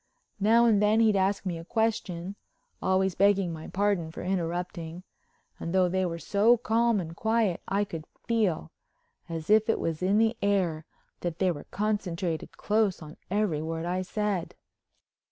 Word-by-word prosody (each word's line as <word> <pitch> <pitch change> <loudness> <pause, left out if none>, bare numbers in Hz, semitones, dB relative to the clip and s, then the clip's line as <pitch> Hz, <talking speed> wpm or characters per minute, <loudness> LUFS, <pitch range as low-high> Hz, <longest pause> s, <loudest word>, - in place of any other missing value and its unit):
Now 225 +4 +5
and 215 -3 +4
then 210 +1 +4
he'd 220 -2 +4
ask 195 +1 +1
me 175 -3 -2
a - - -8
question—always 190 -2 -2
begging 195 -2 +3
my 160 0 -8
pardon 195 -4 0
for 160 - -8
interrupting—and 175 -1 -5
though 185 -1 +4
they 185 0 0
were 170 -1 -4
so 210 +7 +3
calm 230 -1 +2
and 165 -2 -6
quiet 220 -3 +1
I 200 +1 +1
could 165 -6 -6 0.2
feel, 205 - 0 0.6
as 165 +2 -3
if 220 +1 +5
it - - +2
was 165 0 -2
in 190 +3 +2
the 225 +1 +3
air, 180 -6 +1 0.3
that 170 -2 -3
they 185 -1 +2
were 145 -4 -7
concentrated 185 -5 -2
close 210 -5 +1
on 155 0 -10
every 195 -6 0
word 165 +1 -3
I 180 +1 -1
said. 200 -2 -2
190 Hz, 155 wpm, -28 LUFS, 170-210 Hz, 0.6 s, Now